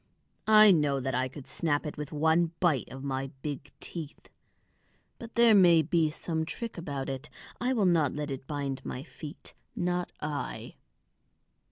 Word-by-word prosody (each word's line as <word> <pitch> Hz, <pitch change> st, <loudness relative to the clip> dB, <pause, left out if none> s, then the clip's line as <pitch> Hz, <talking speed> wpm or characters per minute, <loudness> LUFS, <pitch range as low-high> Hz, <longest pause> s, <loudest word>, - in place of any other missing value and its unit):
"I 215 Hz, -1 st, +8 dB
know 150 Hz, -5 st, +3 dB
that 130 Hz, 0 st, -2 dB
I 130 Hz, +1 st, +1 dB
could 135 Hz, +1 st, -10 dB
snap 150 Hz, -3 st, -1 dB
it 150 Hz, -, -4 dB
with 150 Hz, -1 st, -6 dB
one 160 Hz, +2 st, +2 dB
bite 155 Hz, -10 st, +2 dB
of 135 Hz, +1 st, -8 dB
my 135 Hz, -1 st, -2 dB
big 145 Hz, -1 st, -5 dB
teeth. 160 Hz, -4 st, -7 dB, 0.9 s
But 230 Hz, -1 st, -10 dB
there 235 Hz, -1 st, +6 dB
may 175 Hz, -5 st, +7 dB
be 165 Hz, 0 st, +2 dB
some 160 Hz, +1 st, -2 dB
trick 230 Hz, +8 st, -5 dB
about 145 Hz, -6 st, -4 dB
it; 135 Hz, +2 st, -5 dB, 0.3 s
I 250 Hz, +2 st, +1 dB
will 220 Hz, -6 st, +2 dB
not 165 Hz, -6 st, +3 dB
let 150 Hz, -1 st, -3 dB
it 135 Hz, 0 st, -6 dB
bind 140 Hz, -2 st, -3 dB
my 125 Hz, -, -5 dB
feet, 155 Hz, 0 st, -10 dB, 0.2 s
not 180 Hz, 0 st, -1 dB
I." 145 Hz, -3 st, -4 dB
150 Hz, 165 wpm, -29 LUFS, 140-175 Hz, 0.9 s, I